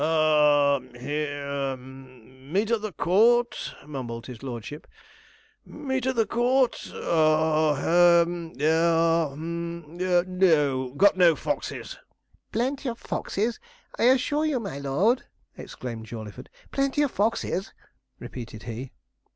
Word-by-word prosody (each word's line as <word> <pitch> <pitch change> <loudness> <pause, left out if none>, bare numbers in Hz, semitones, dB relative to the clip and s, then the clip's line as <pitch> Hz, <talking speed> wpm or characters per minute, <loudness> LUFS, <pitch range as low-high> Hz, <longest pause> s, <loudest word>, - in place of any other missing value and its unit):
'Ha 150 -3 +4 0.2
he 150 +4 -2
hum. 135 -2 -7
Meet 205 +5 +1
at 230 -2 +1
the 215 -1 -4
Court,' 225 +10 +2
mumbled 125 -5 -6
his 125 -3 -9
lordship 130 +3 -7 0.8
'meet 265 -4 -3
at 260 - 0
the 225 -1 +2
Court 250 +2 +2 0.2
ha 155 -1 +2
he 135 - -5 0.8
ha 165 0 +3
hum 170 +2 -6
no; 175 -8 +2
got 200 -1 +5
no 175 -3 +6
foxes.' 395 - -4 0.5
'Plenty 260 +3 -1
of 230 - -5
foxes, 225 +1 -3 0.4
I - - +3
assure 265 +4 +3
you, 295 -5 0
my 195 -11 -6
lord!' 180 - +1 0.3
exclaimed 115 -3 -8
Jawleyford. 110 -3 -9 0.2
'Plenty 275 +1 +1
of 280 - 0
foxes!' 205 -3 -1 0.5
repeated 115 -3 -8
he. 120 +2 -6
160 Hz, 115 wpm, -26 LUFS, 135-225 Hz, 0.8 s, no